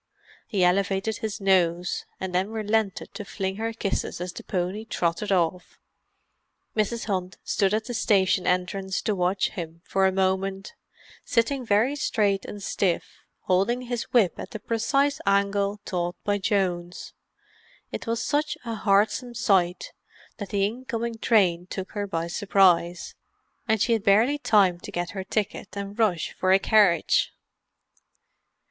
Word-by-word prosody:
He 195 -3 +1
elevated 195 +3 +1
his 215 -1 -4
nose—and 180 -1 0
then 185 +3 +1
relented 220 -2 -1
to 210 - -6
fling 190 -1 -4
her 225 +1 -2
kisses 210 -6 -3
as 180 0 -5
the - - -9
pony 185 +3 -2
trotted 180 -1 -1
off. 180 -1 0 1.0
Mrs. 220 +2 0
Hunt 185 -3 -3
stood 195 -1 +1
at 215 +1 0
the 245 - -5
station 190 -4 +2
entrance 190 +1 0
to 215 - +1
watch 185 0 +1
him 170 -1 -7
for 190 0 +2
a - - +2
moment—sitting 195 +6 -2
very 225 +5 +2
straight 210 -9 0
and 205 -1 -8
stiff, 185 -3 -1 0.2
holding 200 +7 +1
his 240 -1 -3
whip 220 -8 +3
at - - -6
the 215 - -7
precise 275 +7 0
angle 200 +1 +1
taught 175 -1 -2
by 205 0 0
Jones. 180 -4 -1 0.8
It - - -6
was 230 0 -1
such 300 +1 0
a 230 - -3
heartsome 220 +4 +1
sight 190 -6 +1 0.4
that 205 - -6
the 200 -1 +1
incoming 230 0 -4
train 180 -7 +2
took 190 +1 -6
her 205 -1 -3
by 165 -3 -2
surprise, 175 -1 +2 0.5
and 220 0 +2
she 230 - +2
had 220 -3 0
barely 225 +9 +4
time 195 -9 +3
to - - -9
get 175 0 -3
her 190 -2 -5
ticket 205 0 -2
and 200 +2 -6
rush 190 -8 +1
for 185 - 0
a 190 - +7
carriage. 195 -3 +3
200 Hz, 145 wpm, -25 LUFS, 185-220 Hz, 1.0 s, a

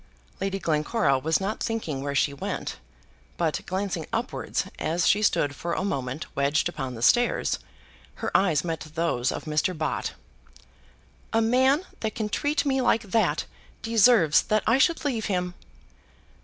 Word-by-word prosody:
Lady 195 0 -1
Glencora 155 - +1
was 160 +3 +1
not 200 +3 -3
thinking 165 -12 -2
where 140 0 -3
she 140 +1 +2
went, 140 - -4 0.6
but, 165 -3 0
glancing 185 -3 -2
upwards, 235 +3 -2
as 170 +2 0
she 210 - +4
stood 145 -8 +2
for 170 - -3
a - - -1
moment 135 -5 -3
wedged 140 +4 +2
upon 135 -7 -5
the 115 - -6
stairs, 240 - +3 0.6
her - - -4
eyes 165 -6 +3
met 165 -2 -3 0.2
those 150 -7 0
of - - -5
Mr. 155 +3 0
Bott. 155 -1 -2 1.2
"A 225 - +4
man 260 +8 +3
that 220 -2 -3
can 215 -2 -2
treat 290 +7 0
me 270 -1 +1
like 230 -2 +2
that 195 -7 +1 0.4
deserves 225 -8 +5
that 215 -1 0
I 235 +4 +3
should 330 +1 +2
leave 235 -6 -1
him." 180 -3 -1
180 Hz, 155 wpm, -26 LUFS, 150-225 Hz, 1.2 s, deserves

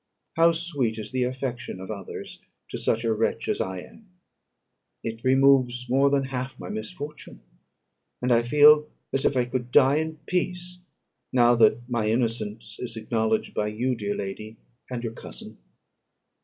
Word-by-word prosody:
How 165 +1 +6
sweet 145 -9 -2
is 105 -1 -6
the 130 -1 +1
affection 125 -5 -4
of 95 +2 -7
others 100 -3 -7 0.3
to - - -5
such 115 +1 0
a 115 -1 +2
wretch 110 +1 -1
as - - 0
I 95 -1 -3
am! 215 - -16 0.9
It 115 0 -5
removes 130 -2 +4
more 135 +3 +4
than 140 -1 +2
half 130 0 -5
my - - -7
misfortune; 180 -9 -7 0.8
and 125 0 0
I 120 -1 +5
feel 150 +4 +6 0.2
as 135 - 0
if 140 - +2
I 125 - +3
could 125 0 -3
die 140 +1 +5
in 160 0 -2
peace, 180 0 -2 0.5
now 120 -1 +5
that 120 +1 +4
my 115 -4 0
innocence 110 -2 -2
is 120 -2 -5
acknowledged 110 0 0
by 105 - 0
you, 120 +5 -1
dear 105 -3 -3
lady, 105 +3 -6 0.3
and 125 -2 -4
your 115 -1 -3
cousin." - - -10
125 Hz, 160 wpm, -26 LUFS, 110-140 Hz, 0.9 s, How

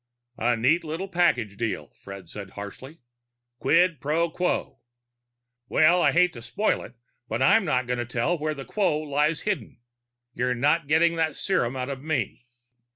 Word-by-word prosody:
"A 120 +1 +2
neat 150 +10 +2
little 165 +5 -4
package 125 - +1
deal," 115 -2 -3
Fred 100 -2 -9
said 100 +2 -8
harshly. 130 +10 -9 0.6
"Quid 170 -2 +3
pro 160 +4 0
quo. 180 +2 -2 0.9
Well, 175 +3 +4
I - - +4
hate 180 0 +3
to 120 - -9
spoil 120 - 0
it, - - -11 0.3
but 110 - -1
I'm 210 +9 +5
not 130 -5 +1
going 125 0 -2
to 120 - -2
tell 120 +8 0
where 155 -1 -2
the 135 -1 -8
quo 190 -8 +1
lies 150 +1 0
hidden. 210 - -3 0.6
You're 125 +1 0
not 145 +5 +2
getting 165 +2 +3
that 160 -2 0
serum 135 -11 0
out 130 +1 -3
of 135 -1 -5
me." 130 -5 -3
150 Hz, 165 wpm, -25 LUFS, 120-170 Hz, 0.9 s, I'm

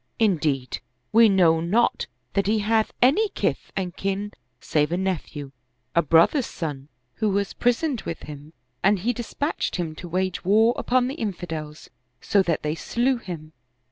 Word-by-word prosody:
Indeed, 155 - +1 0.3
we 225 0 +7
know 175 -4 +4
not 210 +8 +1 0.3
that 200 -1 +1
he 220 +1 +3
hath 220 +1 +1
any 360 - +4
kith - - -2
and 180 -3 -3
kin 195 +1 -2 0.3
save 150 0 0
a 175 - +1
nephew, 160 -7 -3 0.4
a 170 - +4
brother's 170 - +4
son, 145 -5 -5 0.3
who 215 -2 +1
was 200 0 0
prisoned 245 +1 +1
with 165 - -5
him, 150 +1 -10 0.3
and 200 +2 +4
he 225 +7 0
dispatched 245 +6 -3
him 170 -4 -2
to 175 - -8
wage 185 +1 -1
war 220 +5 +4
upon 250 0 +1
the 265 - -3
in 210 -3 -1
fidels, 155 -4 -7 0.3
so 200 - +3
that 170 -4 -1
they 150 0 0
slew 245 +10 0
him." 165 -8 -8
190 Hz, 165 wpm, -24 LUFS, 160-225 Hz, 0.4 s, we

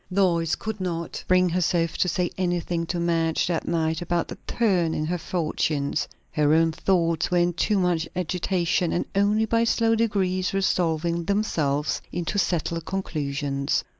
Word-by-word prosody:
Lois 175 -4 +2
could 220 -2 -5
not 170 -2 -3
bring 185 0 +4
herself 170 -1 +1
to - - +1
say 175 0 0
anything 175 -2 -1
to 175 - -2
Madge 165 -1 +1
that 170 -2 -2
night 160 -1 0
about 175 0 -1
the - - -7
turn 185 -8 +1
in 155 - -1
her 175 +3 -1
fortunes. 155 -4 -1 0.2
Her 150 0 +3
own 165 0 +3
thoughts 170 -1 +1
were 180 - +1
in 175 0 +2
too 205 +5 +1
much 175 -3 +1
agitation, 180 -1 0
and 175 - 0
only 205 +2 +2
by 230 +1 +2
slow 230 0 +2
degrees 195 -5 0
resolving 170 -3 0
themselves 155 -8 0
into 175 +4 -2
settled 170 -2 -1
conclusions. 145 -6 -2
175 Hz, 155 wpm, -25 LUFS, 165-185 Hz, 0.2 s, bring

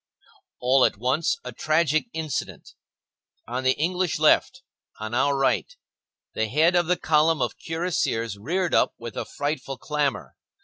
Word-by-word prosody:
All 130 +1 +4
at - - +2
once, 135 +6 0
a 125 - -6
tragic 155 - +1
incident; 160 -3 -5 0.7
on 125 +3 -3
the 130 0 +2
English 180 +2 0
left, 255 +12 +3 0.4
on 110 +1 -5
our 140 +3 +2
right, 135 - 0 0.6
the 110 - -1
head 160 +9 +3
of 175 -2 +2
the 180 0 +2
column 155 +1 +2
of - - -2
cuirassiers 160 - -2
reared 170 - -2
up - - +3
with 115 -1 -8
a - - -3
frightful 145 -2 -4
clamor. 150 0 -2
150 Hz, 145 wpm, -25 LUFS, 130-165 Hz, 0.7 s, All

